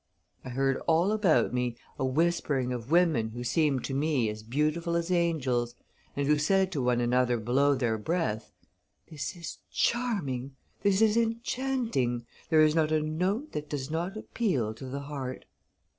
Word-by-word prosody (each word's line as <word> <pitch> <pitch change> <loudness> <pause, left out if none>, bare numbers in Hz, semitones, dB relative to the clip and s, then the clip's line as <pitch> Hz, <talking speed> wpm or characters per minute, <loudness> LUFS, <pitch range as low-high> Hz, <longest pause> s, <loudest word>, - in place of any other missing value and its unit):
I - - -7
heard 135 +1 +1
all 170 +5 +3
about 205 - +3
me 125 -1 -1 0.2
a - - 0
whispering 140 -3 +1
of 120 0 -6
women 160 -10 +3
who 120 +2 -6
seemed 140 +1 +1
to 135 - -3
me 140 -5 +1
as 105 0 -6
beautiful 155 +8 0
as 170 +1 -1
angels, 130 -9 +1 0.4
and 140 - 0
who 150 +1 +3
said 190 +5 +2
to 150 -7 -1
one 125 -1 +2
another 125 0 +2
below 135 +6 +2
their 115 -4 0
breath, 110 -5 -2 0.6
'This 150 +2 -4
is 170 -1 -7
charming, 145 - -1 0.3
this 200 +1 +3
is 220 0 +4
enchanting: 230 - 0 0.2
there 155 -1 +5
is 155 -1 +5
not 155 -1 +2
a 155 - +3
note 185 - -1
that 150 0 -5
does 145 -1 -4
not 175 +6 -2
appeal 160 - -1
to 115 - -10
the 140 +2 -4
heart. 140 -3 -6
150 Hz, 165 wpm, -29 LUFS, 125-170 Hz, 0.6 s, there